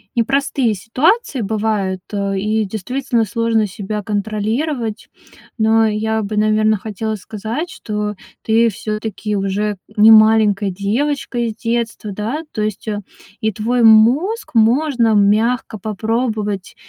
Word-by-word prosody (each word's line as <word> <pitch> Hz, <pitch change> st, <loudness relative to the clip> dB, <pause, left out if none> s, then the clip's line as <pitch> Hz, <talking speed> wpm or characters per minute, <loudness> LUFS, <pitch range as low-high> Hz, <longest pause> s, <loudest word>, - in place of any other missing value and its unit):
непростые 255 Hz, -1 st, +1 dB
ситуации 265 Hz, -, 0 dB
бывают, 205 Hz, -3 st, -1 dB
а, 200 Hz, -1 st, -1 dB
и 215 Hz, +2 st, 0 dB
действительно 230 Hz, +4 st, -2 dB
сложно 225 Hz, 0 st, 0 dB
себя 205 Hz, +2 st, -5 dB
контролировать. 220 Hz, +4 st, -2 dB, 0.5 s
Но 225 Hz, 0 st, +3 dB
я 220 Hz, +1 st, -1 dB
бы, 210 Hz, +1 st, -4 dB
наверно, 215 Hz, 0 st, +3 dB
хотела 220 Hz, +2 st, -4 dB
сказать, 220 Hz, -, -5 dB
что 210 Hz, -8 st, -4 dB, 0.3 s
ты 230 Hz, +1 st, +3 dB
всё-таки 215 Hz, 0 st, -4 dB
уже 200 Hz, +1 st, -1 dB, 0.2 s
не 215 Hz, +2 st, +7 dB
маленькая 215 Hz, -2 st, +5 dB
девочка 240 Hz, +8 st, -2 dB
из 230 Hz, -2 st, -1 dB
детства, 230 Hz, -2 st, -2 dB
да. 230 Hz, +11 st, -3 dB
То 215 Hz, -, -2 dB
есть, 215 Hz, +1 st, -3 dB
э, 210 Hz, -1 st, -2 dB, 0.4 s
и 220 Hz, -1 st, +1 dB
твой 235 Hz, +4 st, 0 dB
мозг 260 Hz, -, +4 dB
можно 235 Hz, 0 st, +3 dB
мягко 215 Hz, +3 st, +2 dB
попробовать 215 Hz, -1 st, -2 dB
220 Hz, 120 wpm, -18 LUFS, 210-235 Hz, 0.5 s, не